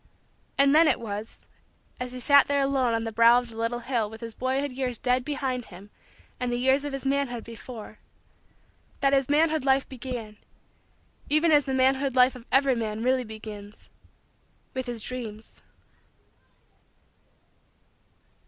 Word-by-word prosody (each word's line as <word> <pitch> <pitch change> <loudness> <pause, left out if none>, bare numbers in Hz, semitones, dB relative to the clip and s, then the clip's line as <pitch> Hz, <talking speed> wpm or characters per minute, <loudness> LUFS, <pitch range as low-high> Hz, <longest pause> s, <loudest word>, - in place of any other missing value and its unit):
And 275 0 +5
then 320 +2 +6
it 270 - +2
was 215 -1 -7 0.5
as 250 0 -5
he 255 - -6
sat 280 +2 +5
there 285 0 +1
alone 265 -4 +1
on 225 - -1
the 225 - -4
brow 230 +2 +6
of 245 -1 -2
the - - -12
little 230 +2 -2
hill 235 -4 -1
with 220 +1 -10
his 230 -1 -6
boyhood 265 +3 -1
years 250 -2 -2
dead 250 +1 +1
behind 265 -3 -3
him 195 +3 -14 0.5
and 250 -1 -2
the 240 - 0
years 265 +3 +2
of 290 - -4
his 275 0 -5
manhood 270 -4 -1
before 230 -1 -10 1.0
that 275 -1 +3
his 270 -1 +2
manhood 310 0 +2
life 270 0 +2
began, 240 -5 -7 0.9
even 310 +2 +3
as 290 -2 +5
the 265 - -2
manhood 265 +1 +2
life 255 +1 +5
of 245 -1 -12
every 270 +1 +4
man 220 -2 -3
really 255 0 +2
begins, 215 -2 -10 0.8
with 260 -1 -4
his 235 -3 -3
Dreams. 225 -4 -8
250 Hz, 155 wpm, -26 LUFS, 230-275 Hz, 1.0 s, then